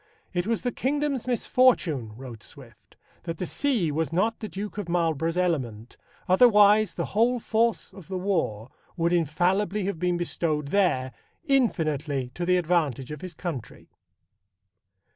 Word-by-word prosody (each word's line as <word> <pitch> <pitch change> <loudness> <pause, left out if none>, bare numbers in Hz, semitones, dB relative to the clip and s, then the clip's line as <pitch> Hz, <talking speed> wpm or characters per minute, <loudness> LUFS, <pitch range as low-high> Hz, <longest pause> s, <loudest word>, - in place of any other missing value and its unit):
"It 175 +2 -1
was 230 -1 -1
the 245 - 0
kingdom's 280 -1 -1
misfortune," 205 - +2
wrote 125 -4 -9
Swift, - - -16 0.3
"that 165 -2 -4
the 180 - -3
sea 220 - 0
was 160 +2 -1
not 215 +7 0
the 215 - -5
Duke 205 +2 -6
of 190 -4 -5
Marlborough's 165 -1 0
element, 125 -11 -2 0.3
otherwise 210 +1 +5
the - - -2
whole 240 +4 +3
force 225 -2 0
of 195 -6 -13
the 190 - -4
war 160 - -2 0.3
would 170 +1 +1
infallibly 180 +6 +1
have 195 -4 -3
been 180 0 0
bestowed 155 -4 -2
there, 145 -9 +1 0.3
infinitely 155 - 0
to 175 +3 -4
the 180 0 +4
advantage 155 -7 0
of 150 - -7
his 185 -3 -8
country." 155 - -7
175 Hz, 145 wpm, -26 LUFS, 155-210 Hz, 0.3 s, otherwise